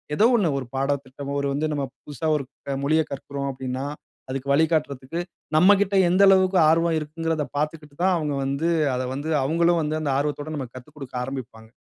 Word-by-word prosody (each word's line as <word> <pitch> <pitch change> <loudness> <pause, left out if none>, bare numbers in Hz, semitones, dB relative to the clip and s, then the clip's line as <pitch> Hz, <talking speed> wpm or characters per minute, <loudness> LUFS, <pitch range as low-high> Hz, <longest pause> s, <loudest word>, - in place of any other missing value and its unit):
ஏதோ 215 - +4
ஒன்னு 190 -8 +2
ஒரு 130 - -6
பாடத்திட்டமோ, 140 0 -2
ஒரு 140 - -1
வந்து 150 +3 -1
நம்ம 140 -1 -1 0.2
புதுசா 150 +2 -5
ஒரு 140 - -1 0.4
மொழியக் 155 +2 +2
கற்கிறோம் 140 0 -4
அப்பிடின்னா, 130 0 -4 0.4
அதுக்கு 135 +1 -4
வழிகாட்டுறதுக்கு 155 -1 +1 0.4
நம்மக்கிட்ட 195 +3 +5
எந்த 185 +3 +3
அளவுக்கு 190 -1 +5
ஆர்வம் 165 0 +3
இருக்குங்கிறத 160 0 -2
பார்த்துக்கிட்டு 150 -1 -3
தான் 190 -1 +4
அவுங்க 150 -2 -2
வந்து 140 +5 -1 0.3
அத 125 - -1
வந்து 145 +4 -4
அவுங்களும் 170 +4 +2
வந்து 155 +1 -1
அந்த 145 -3 0
ஆர்வத்தோட 145 +1 -2
நமக்கு 130 -3 -6
கத்துக்கொடுக்க 135 0 -11
ஆரம்பிப்பாங்க. 120 -4 -7
150 Hz, 160 wpm, -24 LUFS, 135-165 Hz, 0.4 s, நம்மக்கிட்ட